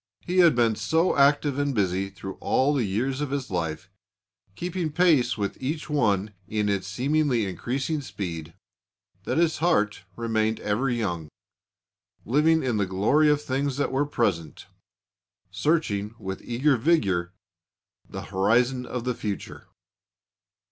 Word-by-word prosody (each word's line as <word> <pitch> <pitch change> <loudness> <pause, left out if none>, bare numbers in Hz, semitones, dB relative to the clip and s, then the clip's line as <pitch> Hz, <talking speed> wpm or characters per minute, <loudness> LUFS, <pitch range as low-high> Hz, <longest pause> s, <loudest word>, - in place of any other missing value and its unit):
He 180 +1 -1
had 170 -6 +6
been 115 -2 +3
so 165 +9 +1
active 145 0 +3
and 145 -2 0
busy 95 -1 0
through 95 0 -8
all 140 +3 +2
the 135 -4 +1
years 130 +8 -1
of 150 - -2
his 135 -4 -3
life, 85 0 -3 0.7
keeping 175 - -3
pace 155 -8 +3
with 100 +3 -3
each 150 +4 -3
one 105 -7 +1
in 105 -1 -1
its 100 -1 -1
seemingly 130 +2 +1
increasing 130 - -2
speed, 85 - -6 0.7
that - - -1
his 165 -1 +2
heart 105 -12 +1
remained 110 -1 0
ever 110 +6 0
young, 90 -10 -2 1.0
living 155 +7 +3
in 125 -4 0
the 100 -2 0
glory 110 +12 +3
of 150 0 +2
things 135 0 -1
that 145 - 0
were 140 +2 +1
present, 85 - -1 0.9
searching 105 - 0
with 95 -2 -6
eager 130 +3 +2
vigour 100 - +1 0.8
the - - -6
horizon 120 +6 +1
of 125 -2 -4
the 125 0 -1
future. 105 -4 -6
120 Hz, 140 wpm, -25 LUFS, 100-145 Hz, 1.0 s, had